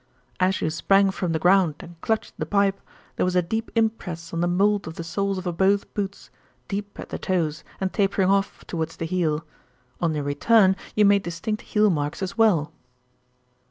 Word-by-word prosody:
"As 185 +1 +1
you 155 - 0
sprang 195 +4 +3
from 180 -3 -2
the 160 - +1
ground 180 -1 +4
and 170 -2 -13
clutched 220 -1 -1
the - - -1
pipe, 200 -1 +1 0.4
there - - +1
was 180 0 0
a 180 - +4
deep 220 +6 -3
impress 180 -8 -1
on 165 - -1
the 175 - +2
mould 200 +3 +2
of 160 - -7
the 170 - -5
soles 195 +3 -1
of 175 -2 -3
both 195 +2 +2
boots, 200 -1 -5 0.4
deep 205 0 -5
at - - -7
the - - -5
toes 165 -4 -1 0.2
and 190 -1 -2
tapering 195 -2 +2
off 195 0 0
towards 165 -1 -4
the 165 - -3
heel. 165 -3 -1 0.6
On 165 -3 +1
your 150 - -2
return 190 +7 +4 0.2
you 210 - +5
made 200 0 +5
distinct 180 +5 -4
heel 210 -1 +2
marks 150 +2 -2
as 190 +2 -4
well." 175 -10 +3
185 Hz, 195 wpm, -24 LUFS, 165-200 Hz, 0.6 s, you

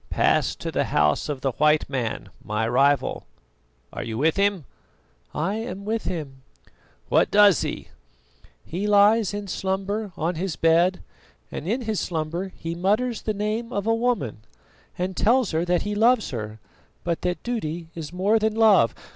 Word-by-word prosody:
"Pass - - +2
to - - -5
the - - 0
house 75 - +1
of 140 -3 -3
the 135 - 0
white 150 0 +3
man, 125 -5 -3
my 105 +2 -1
rival. 135 +3 +1 0.7
Are - - -5
you 110 -1 -4
with 155 +5 +2
him?" 200 -5 +1 0.7
"I 190 +8 -2
am 220 -4 -6
with 220 +1 -2
him." 145 -7 -5 0.7
"What - - +3
does 205 -3 +6
he?" - - -4 0.8
"He 190 +5 -3
lies 210 +1 +4
in 205 0 -5
slumber 195 +3 -2
on 165 +3 -1
his 175 -1 -3
bed, 170 +3 +3 0.5
and 155 - -6
in 235 +6 0
his 220 -4 -2
slumber 170 +3 -3
he 165 0 -5
mutters 210 +7 0
the 215 - -2
name 215 +3 -2
of 200 -3 -2
a 225 - +3
woman, 225 - -1 0.6
and 185 +1 -2
tells 240 +3 +2
her 160 +1 0
that 175 -1 +1
he 210 - -3
loves 225 +2 +3
her, 110 -3 -6 0.4
but 170 -1 -2
that 180 0 -2
duty 170 -9 -4
is 160 -3 -7
more 200 +5 +2
than 220 0 0
love. 210 - +5
185 Hz, 165 wpm, -24 LUFS, 155-215 Hz, 0.8 s, does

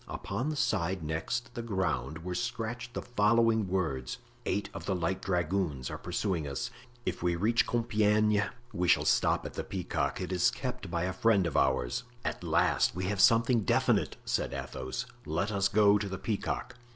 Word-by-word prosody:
Upon 100 +9 -3
the 155 - -2
side 95 - 0
next 115 +11 -3
the 120 - -4
ground 80 - -2
were 90 0 -3
scratched 120 +2 -3
the - - -3
following 115 -1 +3
words: 70 -9 -1 0.3
"Eight 100 - 0
of - - -7
the 95 - +1
light 95 +2 -1
dragoons 90 -7 -1
are - - -4
pursuing 90 -3 -2
us. 70 - -3 0.3
If 90 - -2
we 85 0 +1
reach 110 +7 +2
Compiegne 105 -3 +2 0.3
we 90 0 0
shall - - +4
stop - - +3
at - - -6
the - - -3
Peacock. - - -2
It - - -4
is 90 -1 +4
kept 125 -6 -5
by 85 0 -1
a 95 +1 -1
friend 100 -1 +3
of 85 - -2
ours." 65 -2 +2 0.2
"At - - -3
last 85 +1 +2
we 90 - -3
have 100 +1 -1
something 115 +1 +5
definite," 95 - +2
said - - -1
Athos; 65 0 -4 0.2
"let 85 +7 -1
us 100 -1 +2
go 105 0 +5
to 100 -1 -3
the 95 - -4
Peacock." 115 +5 -3
95 Hz, 180 wpm, -30 LUFS, 85-110 Hz, 0.3 s, something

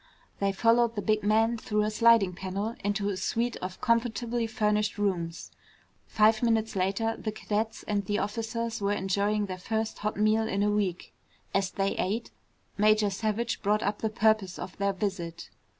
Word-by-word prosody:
They 200 0 +1
followed 230 +3 +3
the 205 - -2
big 215 -1 +2
man 225 +3 +2
through 210 -1 0
a 215 - 0
sliding 230 -4 +4
panel 195 +5 -3
into 205 0 0
a 195 - -2
suite 230 +5 -1
of 185 0 -6
comfortably 230 -1 0
furnished 210 -1 0
rooms. 175 -5 -2 0.6
Five 215 +1 +3
minutes 225 -2 +1
later, 195 +5 0
the 215 - -4
cadets 215 +1 -3
and 205 -1 0
the 205 +2 0
officers 225 +2 -3
were 200 +1 +1
enjoying 205 +2 0
their 185 -2 -6
first 220 +3 -2
hot 210 0 -2
meal 215 +1 +2
in 200 -2 0
a 210 - +2
week. 195 -4 -2 0.4
As 195 -1 +1
they 195 +1 -1
ate, 215 +5 -2 0.5
Major 215 -1 +4
Savage 220 +3 -2
brought 210 +1 +1
up 205 +1 -1
the 220 - 0
purpose 215 -4 +1
of 185 - -7
their 200 0 +1
visit. 185 -4 -4
210 Hz, 170 wpm, -28 LUFS, 200-225 Hz, 0.6 s, sliding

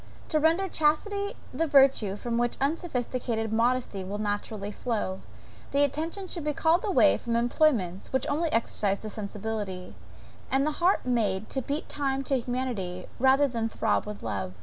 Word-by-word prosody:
To 310 - +2
render 330 +5 +3
chastity 400 +6 0 0.2
the 330 - 0
virtue 270 -8 +4
from 235 +2 -2
which 240 0 0
unsophisticated 250 -7 -1
modesty 235 -3 +1
will 195 +2 -4
naturally 205 0 -3
flow, 210 -5 -2 0.5
the 285 +1 +4
attention 320 +7 -1
should 340 -3 -4
be 300 0 0
called 330 +2 +3
away 380 -8 +4
from 235 -1 -2
employments, 235 - +1
which 265 -1 0
only 315 +2 0
exercise 205 -3 +1
the 215 0 -7
sensibility; 205 -3 -5 0.6
and 270 +1 +2
the 305 - +1
heart 360 -3 +3
made 220 -5 0
to 265 - -1
beat 285 +5 -3
time 275 -2 -1
to 270 -1 +1
humanity, 230 -8 -3
rather 265 +3 +5
than 230 -3 -2
to - - -18
throb - - +1
with 210 -1 -7
love. 95 -2 -3
245 Hz, 165 wpm, -28 LUFS, 210-295 Hz, 0.6 s, rather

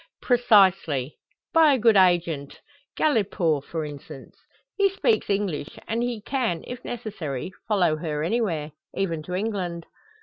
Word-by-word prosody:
"Precisely. 195 - +3 0.3
By 320 -3 +6
a - - +2
good 225 -2 +4
agent. 175 -6 +2 0.4
Galipaud, 195 - +1
for 160 -2 -4
instance. 140 -2 -10 0.4
He 400 -1 +3
speaks 435 +3 0
English, 195 -8 -2
and 230 +1 -1
he 240 -3 -2
can, 235 -12 -1
if 250 0 -8
necessary, 185 - -5 0.2
follow 180 -8 +2
her 155 -2 -3
anywhere, 170 -6 -1 0.2
even 170 -5 -1
to 180 +4 -5
England." 185 -5 -3
190 Hz, 130 wpm, -25 LUFS, 160-230 Hz, 0.4 s, By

